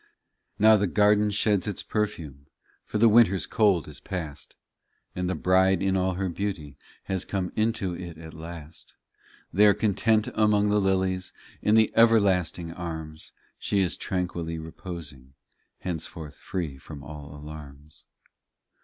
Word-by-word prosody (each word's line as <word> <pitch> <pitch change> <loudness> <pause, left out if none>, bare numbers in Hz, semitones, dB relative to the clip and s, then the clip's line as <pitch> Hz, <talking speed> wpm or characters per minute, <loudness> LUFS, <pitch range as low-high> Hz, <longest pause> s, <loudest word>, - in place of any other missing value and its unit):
22 105 - -3
Now 110 - +7
the 100 0 +1
garden 105 +2 +3
sheds 105 -1 +1
its 105 - -3
perfume, 80 -10 -3 0.4
For - - -3
the 115 +2 +6
winter 110 -3 +6
s 95 - -2
cold 105 - +2
is - - -9
past, 80 -6 -6 0.6
And 90 0 -2
the 95 - -1
bride 95 0 +3
in 95 -1 +1
all 95 -1 +1
her 95 +1 -1
beauty 85 -6 -4 0.3
Has 95 -1 -2
come 95 -3 -3
into 110 -4 0
it 85 -2 -8
at 80 -1 -10
last. 80 -1 -9 0.6
There, 100 +2 +6
content 110 +1 +2
among 105 -1 +3
the 105 0 +3
lilies, 95 -1 0 0.3
In 105 - +3
the 110 -1 +4
everlasting 95 -7 +3
arms, 80 -3 -7 0.3
She 100 - +1
is 90 -2 +1
tranquilly 85 -3 -3
reposing, 80 -5 -9 0.5
Henceforth 80 -3 -5
free 80 -8 -5
from 70 0 -10
all 75 -1 -9
alarms. 75 0 -11
90 Hz, 145 wpm, -26 LUFS, 80-105 Hz, 0.6 s, Now